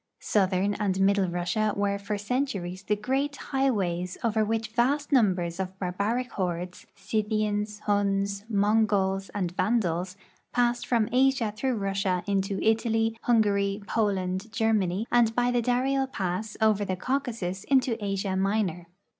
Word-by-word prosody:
Southern 195 Hz, 0 st, +1 dB
and 195 Hz, -2 st, -1 dB
middle 195 Hz, 0 st, +3 dB
Russia 180 Hz, +5 st, -1 dB
were 200 Hz, 0 st, 0 dB
for 205 Hz, +1 st, -3 dB
centuries 205 Hz, -5 st, -2 dB
the 210 Hz, +2 st, 0 dB
great 270 Hz, +7 st, -1 dB
high 270 Hz, -1 st, 0 dB
ways 180 Hz, -5 st, -2 dB
over 220 Hz, -1 st, +2 dB
which 225 Hz, +1 st, -1 dB
vast 265 Hz, +6 st, +1 dB
numbers 185 Hz, -9 st, +2 dB
of 190 Hz, 0 st, -4 dB
barbaric 200 Hz, +7 st, -2 dB
hordes 180 Hz, -1 st, -4 dB
— -, -, -44 dB
Scythians, 210 Hz, 0 st, -1 dB
Huns, 200 Hz, -1 st, 0 dB
Mongols, 200 Hz, -2 st, +2 dB
and 180 Hz, -4 st, -1 dB
Vandals 185 Hz, -3 st, 0 dB, 0.2 s
— -, -, -38 dB
passed 240 Hz, 0 st, +1 dB
from 230 Hz, -3 st, +2 dB
Asia 255 Hz, -3 st, +2 dB
through 255 Hz, +3 st, -1 dB
Russia 195 Hz, -3 st, -1 dB
into 195 Hz, 0 st, -1 dB
Italy, 225 Hz, 0 st, +2 dB
Hungaiy, 200 Hz, -3 st, +2 dB
Poland, 195 Hz, -1 st, -1 dB
Germany, 215 Hz, -3 st, +1 dB
and 230 Hz, -2 st, +3 dB
by 245 Hz, 0 st, +2 dB
the 245 Hz, -1 st, +2 dB
Dari 250 Hz, +3 st, +1 dB
el 270 Hz, -1 st, +1 dB
pass 205 Hz, -2 st, -3 dB
over 215 Hz, -2 st, +3 dB
the 190 Hz, -2 st, -2 dB
Caucasus 225 Hz, -5 st, -2 dB
into 255 Hz, -5 st, +1 dB
Asia 195 Hz, -1 st, -1 dB
Minor. 190 Hz, -3 st, 0 dB
205 Hz, 145 wpm, -27 LUFS, 190-230 Hz, 0.2 s, middle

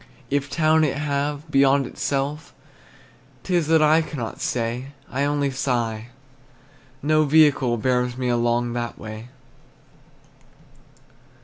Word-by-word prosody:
If 140 Hz, 0 st, 0 dB
town 155 Hz, 0 st, +3 dB
it 140 Hz, -2 st, 0 dB
have, 145 Hz, +1 st, -2 dB
beyond 135 Hz, 0 st, +4 dB
itself, 145 Hz, +4 st, -3 dB, 0.9 s
'T 185 Hz, -, -3 dB
is 170 Hz, -4 st, +1 dB
that 160 Hz, -1 st, +4 dB
I 155 Hz, +2 st, +5 dB
cannot 135 Hz, -8 st, -6 dB
say; 125 Hz, +3 st, -3 dB, 0.2 s
I 140 Hz, +3 st, 0 dB
only 145 Hz, -1 st, 0 dB
sigh, 120 Hz, -4 st, -2 dB, 1.0 s
no 155 Hz, +1 st, +3 dB
vehicle 140 Hz, -5 st, +4 dB
Bears 125 Hz, +1 st, 0 dB
me 130 Hz, -1 st, -2 dB
along 120 Hz, 0 st, 0 dB
that 120 Hz, -1 st, -4 dB
way. 110 Hz, +2 st, -9 dB
140 Hz, 115 wpm, -23 LUFS, 120-150 Hz, 1.0 s, I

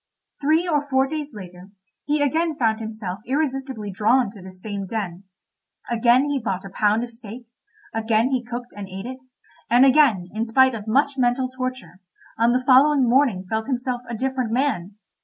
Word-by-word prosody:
Three 315 Hz, +5 st, +2 dB
or 295 Hz, -3 st, 0 dB
four 265 Hz, 0 st, +3 dB
days 300 Hz, +1 st, -5 dB
later, 185 Hz, -3 st, -11 dB, 0.4 s
he 295 Hz, 0 st, +1 dB
again 320 Hz, +3 st, 0 dB
found 225 Hz, -5 st, +1 dB
himself 215 Hz, -4 st, -6 dB
irresistibly 265 Hz, -6 st, -2 dB
drawn 220 Hz, +3 st, +2 dB
to 205 Hz, -3 st, -13 dB
this 185 Hz, 0 st, -12 dB
same 200 Hz, -1 st, -5 dB
den. 195 Hz, -3 st, -5 dB, 0.7 s
Again 240 Hz, +3 st, +4 dB
he 285 Hz, -2 st, -1 dB
bought 195 Hz, -3 st, -3 dB
a 195 Hz, -, -9 dB
pound 210 Hz, +3 st, +1 dB
of 240 Hz, -, -7 dB
steak, 230 Hz, +1 st, -11 dB, 0.5 s
again 225 Hz, +2 st, +1 dB
he 255 Hz, -2 st, 0 dB
cooked 240 Hz, 0 st, -7 dB
and 200 Hz, -2 st, -7 dB
ate 190 Hz, +2 st, -7 dB
it, 260 Hz, +1 st, -8 dB, 0.5 s
and 245 Hz, +3 st, +6 dB
again, 260 Hz, -10 st, +4 dB
in 220 Hz, +2 st, -2 dB
spite 260 Hz, +3 st, +4 dB
of 220 Hz, -1 st, -7 dB
much 275 Hz, +4 st, +1 dB
mental 250 Hz, +1 st, +1 dB
torture, 255 Hz, -6 st, -6 dB, 0.4 s
on 230 Hz, +1 st, +3 dB
the 255 Hz, +1 st, 0 dB
following 270 Hz, 0 st, +5 dB
morning 240 Hz, -7 st, +2 dB
felt 220 Hz, +3 st, -2 dB
himself 250 Hz, -2 st, -2 dB
a 235 Hz, -, -3 dB
different 260 Hz, -2 st, -2 dB
man. 225 Hz, -7 st, -1 dB
240 Hz, 175 wpm, -23 LUFS, 215-265 Hz, 0.7 s, and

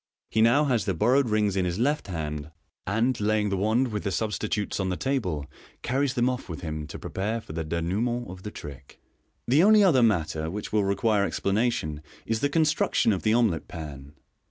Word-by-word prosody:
He 110 Hz, -, +2 dB
now 120 Hz, +7 st, +5 dB
has 120 Hz, -7 st, +1 dB
the 95 Hz, -, -1 dB
bor 110 Hz, +9 st, +2 dB
rowed 135 Hz, -3 st, +3 dB
rings 105 Hz, -2 st, +1 dB
in 95 Hz, -, +1 dB
his 90 Hz, 0 st, -2 dB
left 145 Hz, +4 st, 0 dB
hand, 75 Hz, -4 st, -4 dB, 0.4 s
and 115 Hz, +6 st, +1 dB
(laying 105 Hz, -1 st, +1 dB
ihe 95 Hz, -, 0 dB
wand 110 Hz, +6 st, +2 dB
with 105 Hz, -2 st, -3 dB
the 100 Hz, -, -1 dB
substitutes 105 Hz, 0 st, -2 dB
on 95 Hz, -1 st, 0 dB
the 90 Hz, -, -2 dB
table) 95 Hz, -, -1 dB, 0.4 s
carries 135 Hz, +2 st, 0 dB
them 120 Hz, -1 st, +2 dB
off 125 Hz, -4 st, -3 dB
with 80 Hz, -, -6 dB
him 75 Hz, -2 st, -5 dB
to -, -, -8 dB
prepare 110 Hz, +4 st, -3 dB
for 95 Hz, -, -10 dB
the 80 Hz, 0 st, -3 dB
denouement 100 Hz, +10 st, -1 dB
of 90 Hz, 0 st, -9 dB
the 105 Hz, -, -6 dB
trick. 70 Hz, -8 st, -11 dB, 0.5 s
The 135 Hz, +6 st, +5 dB
only 210 Hz, +2 st, +6 dB
other 155 Hz, -10 st, +5 dB
matter 80 Hz, -8 st, +1 dB
which 105 Hz, +5 st, -6 dB
will 105 Hz, -1 st, +3 dB
re 100 Hz, 0 st, +1 dB
quire 105 Hz, 0 st, +2 dB
explanation 100 Hz, -8 st, -1 dB, 0.2 s
is 115 Hz, 0 st, -1 dB
the 145 Hz, -, +1 dB
construction 155 Hz, -7 st, +2 dB
of 95 Hz, -, -2 dB
the 110 Hz, +1 st, +2 dB
omelet 110 Hz, -9 st, +1 dB
pan. 70 Hz, -3 st, -8 dB
105 Hz, 205 wpm, -26 LUFS, 85-120 Hz, 0.5 s, only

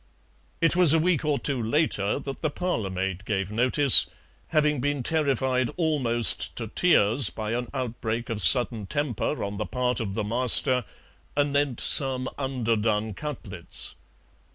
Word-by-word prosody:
It 165 Hz, 0 st, +2 dB
was 175 Hz, -4 st, +5 dB
a -, -, +4 dB
week 165 Hz, -2 st, 0 dB
or 150 Hz, -2 st, 0 dB
two 140 Hz, -4 st, -3 dB
later 110 Hz, -4 st, -1 dB
that 135 Hz, -1 st, -8 dB
the 155 Hz, -, -1 dB
parlour 145 Hz, -, -3 dB
maid 95 Hz, 0 st, -4 dB
gave 100 Hz, -2 st, -3 dB
notice, 130 Hz, +4 st, +7 dB, 0.4 s
having 150 Hz, -2 st, 0 dB
been 145 Hz, -1 st, -2 dB
terrified 130 Hz, -5 st, -1 dB
almost 130 Hz, -9 st, 0 dB
to 115 Hz, -3 st, -5 dB
tears 115 Hz, -, +3 dB
by 110 Hz, +4 st, -6 dB
an 120 Hz, +1 st, -3 dB
outbreak 120 Hz, -3 st, -4 dB
of 105 Hz, -2 st, -2 dB
sudden 110 Hz, +3 st, +4 dB
temper 145 Hz, 0 st, -3 dB
on 100 Hz, 0 st, -5 dB
the -, -, -4 dB
part 125 Hz, -1 st, -2 dB
of 100 Hz, -4 st, -5 dB
the 110 Hz, -, -2 dB
master 125 Hz, +2 st, +3 dB, 0.5 s
anent 145 Hz, -3 st, 0 dB
some 130 Hz, -2 st, 0 dB
underdone 110 Hz, -5 st, -2 dB
cutlets. 150 Hz, +7 st, -7 dB
125 Hz, 145 wpm, -25 LUFS, 110-145 Hz, 0.5 s, notice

